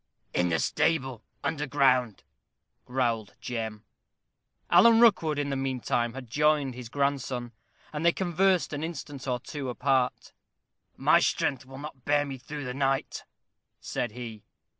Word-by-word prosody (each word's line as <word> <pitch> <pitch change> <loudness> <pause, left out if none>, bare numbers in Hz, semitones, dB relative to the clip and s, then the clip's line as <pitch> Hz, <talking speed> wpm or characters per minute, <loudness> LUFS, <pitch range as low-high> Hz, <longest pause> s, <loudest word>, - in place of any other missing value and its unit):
"In 90 0 +2
the 80 - +2
stable, 130 - 0 0.2
under 150 0 -1
ground," 130 -6 +2 0.6
growled 120 -4 -1
Jem. 110 -3 -5 0.9
Alan 225 +6 +7
Rookwood, 185 -10 +4
in 145 -1 -1
the - - 0
mean 135 -1 -2
time, 120 0 -1
had 135 -2 -7
joined 145 +1 +2
his 120 -2 -8
grandson, 135 -3 -1 0.4
and 150 +1 -3
they 170 - +6
conversed 185 -1 +1
an 145 +1 -3
instant 145 -5 -6
or 125 -1 0
two 140 +1 -5
apart. 130 0 0 0.6
"My - - +5
strength 130 -2 0
will 135 0 -10
not 140 -3 -9
bear 145 +1 +2
me 135 -2 -6
through 145 +2 -7
the 125 - -4
night," 135 0 -1 0.5
said 120 -3 -3
he. 115 -3 -8
135 Hz, 145 wpm, -28 LUFS, 125-150 Hz, 0.9 s, Alan